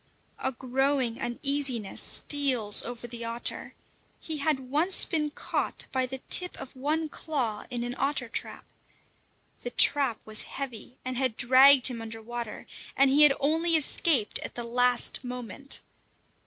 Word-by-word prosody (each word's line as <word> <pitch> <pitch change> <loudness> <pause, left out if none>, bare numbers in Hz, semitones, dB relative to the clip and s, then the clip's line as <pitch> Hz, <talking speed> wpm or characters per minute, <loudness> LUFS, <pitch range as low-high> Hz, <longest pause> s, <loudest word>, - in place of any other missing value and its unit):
A 260 - -2
growing 260 -1 -1
uneasiness 255 -3 -2
steals 255 -8 +2
over 240 0 -8
the 235 -1 -7
otter. 230 +1 -2 0.4
He 315 -2 -6
had 290 -1 -1
once 335 +6 +5
been 305 -2 -2
caught 295 - -3
by 260 -1 -1
the 265 +1 -8
tip 360 -1 +5
of 270 - -10
one 305 +4 -2
claw 255 -9 -4
in 240 -1 -4
an 245 0 -4
otter 275 -2 -1
trap. 230 - -7 1.0
The 245 - -5
trap 265 -1 +3
was 215 0 +2
heavy, 250 -2 -8
and 255 -1 -4
had 255 -4 -1
dragged 260 +2 +6
him 235 -3 +4
under 225 0 -8
water; 235 0 -7 0.3
and 275 -1 +4
he 290 +2 +4
had 295 -2 +7
only 325 +4 +1
escaped 285 -6 +1
at - - -8
the 240 - -4
last 245 +2 +2
moment. 250 +2 -5
260 Hz, 150 wpm, -27 LUFS, 240-285 Hz, 1.0 s, had